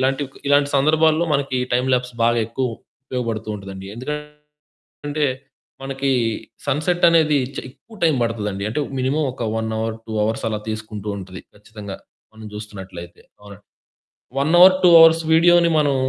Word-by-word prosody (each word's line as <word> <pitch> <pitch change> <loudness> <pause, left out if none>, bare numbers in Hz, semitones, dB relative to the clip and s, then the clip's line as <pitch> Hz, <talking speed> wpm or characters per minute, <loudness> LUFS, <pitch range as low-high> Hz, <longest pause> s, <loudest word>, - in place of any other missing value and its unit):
ఇలాంటివి 135 +1 0
కొ - - -17
ఇలాంటి 145 0 +3
సందర్భాల్లో 155 +3 +3
మనకి 140 -2 -1
టైమ్ 125 +2 +1
ల్యాప్స్ 125 -1 -3
బాగా 120 0 +2
ఎక్కువ 130 +3 -2 0.4
ఉపయోగబడుతూ 115 -4 -4
ఉంటదండి. 95 -1 -9
ఎందుకంటే 150 +2 -8 1.2
మనకి 135 0 -1 0.6
సన్‌సెట్ 170 +5 +2
అనేది 155 -3 +3 0.2
చ్ - - -4
ఎక్కువ 220 - -18
టైం 160 - +4
పడతదండి. 105 -3 -3
అంటే, 150 - -2 0.2
మినిమమ్ 140 +3 0
ఒక 125 - -7 0.2
1 110 0 -3
అవర్, 110 0 -2
2 110 - -7
అవర్స్ 110 +1 -2
అలా 105 -1 -3
తీసుకుంటూ 110 -1 -6
ఉంటది 95 -1 -9
ఖచ్చితంగా 105 -1 -9 0.4
మనం 110 - -12
జూస్తున్నట్లయితే. 95 -5 -9 0.2
అవునండి. 100 -1 -14 0.7
1 145 +4 +1
అవర్, 185 +1 +8
2 180 - +7
అవర్స్ 165 0 +7
వీడియోని 170 +1 +5
మనం 145 -2 +2
130 Hz, 145 wpm, -21 LUFS, 110-150 Hz, 1.2 s, అవర్